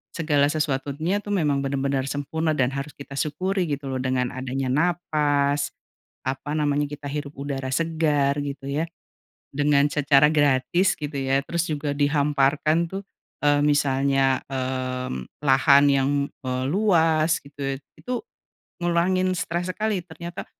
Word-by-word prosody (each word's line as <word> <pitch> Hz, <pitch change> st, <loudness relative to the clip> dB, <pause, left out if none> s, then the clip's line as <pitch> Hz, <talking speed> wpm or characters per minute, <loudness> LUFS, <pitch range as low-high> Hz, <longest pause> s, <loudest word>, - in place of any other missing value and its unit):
segala 150 Hz, -4 st, +2 dB
sesuatunya 150 Hz, +4 st, -1 dB
tuh 205 Hz, 0 st, -3 dB
memang 150 Hz, -6 st, +1 dB
benar-benar 135 Hz, -1 st, -1 dB
sempurna 155 Hz, +3 st, -1 dB
dan 130 Hz, -2 st, +1 dB
harus 140 Hz, +2 st, -4 dB
kita 140 Hz, 0 st, -10 dB
syukuri, 185 Hz, +4 st, -1 dB
gitu 140 Hz, -2 st, -3 dB
loh, 130 Hz, -, -2 dB
dengan 130 Hz, -1 st, 0 dB
adanya 130 Hz, +1 st, -3 dB
napas, 145 Hz, -3 st, +1 dB, 0.6 s
apa 135 Hz, +2 st, -3 dB
namanya, 145 Hz, -1 st, +1 dB
kita 145 Hz, 0 st, -7 dB
hirup 145 Hz, 0 st, -5 dB
udara 135 Hz, -1 st, -4 dB
segar 150 Hz, -2 st, +1 dB
gitu 140 Hz, -1 st, -6 dB
ya, 150 Hz, +4 st, 0 dB, 0.7 s
dengan 145 Hz, 0 st, +3 dB
secara 145 Hz, -1 st, +4 dB
gratis 145 Hz, +5 st, +3 dB
gitu 150 Hz, 0 st, -5 dB
ya, 135 Hz, 0 st, +1 dB
terus 170 Hz, -1 st, -1 dB
juga 150 Hz, -1 st, -2 dB
dihamparkan 145 Hz, +2 st, +2 dB
tuh, 195 Hz, +1 st, -5 dB, 0.4 s
eee, 145 Hz, 0 st, +4 dB
misalnya, 135 Hz, -2 st, +2 dB
mmm, 130 Hz, -, -3 dB, 0.2 s
lahan 140 Hz, +1 st, +5 dB
yang, 135 Hz, 0 st, +2 dB, 0.3 s
eee, 130 Hz, 0 st, -2 dB
luas 165 Hz, -5 st, +3 dB
gitu, 140 Hz, -1 st, -5 dB, 0.2 s
itu 250 Hz, -, -6 dB, 0.7 s
ngurangin 185 Hz, +2 st, +2 dB
stres 175 Hz, +2 st, -2 dB
sekali 210 Hz, -2 st, -1 dB
ternyata, 170 Hz, +1 st, -8 dB
145 Hz, 130 wpm, -24 LUFS, 135-160 Hz, 0.7 s, lahan